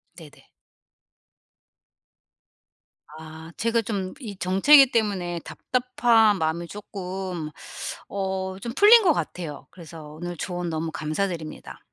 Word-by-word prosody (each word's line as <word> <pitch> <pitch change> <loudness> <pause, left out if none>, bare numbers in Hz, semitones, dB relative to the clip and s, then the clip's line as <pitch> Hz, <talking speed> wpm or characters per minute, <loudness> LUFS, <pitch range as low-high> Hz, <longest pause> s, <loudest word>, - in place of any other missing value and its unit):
네네. - - -15 2.7
아. 160 +1 -11
제가 230 0 +1
좀 195 -4 -4
이 215 -7 -7
정체기 250 +10 +6
때문에 190 -6 -1
답답한 240 -4 +2
마음이 160 +1 -2
쪼끔 185 -4 -6 0.6
어 190 -1 -3
좀 235 0 -5
풀린 440 - +7
것 345 -4 +5
같아요. 150 - -5
그래서 165 -2 -11
오늘 175 +3 -6
조언 175 0 -4
너무 160 0 -3
감사드립니다. 155 0 -4
185 Hz, 220 characters per minute, -24 LUFS, 165-220 Hz, 2.7 s, 풀린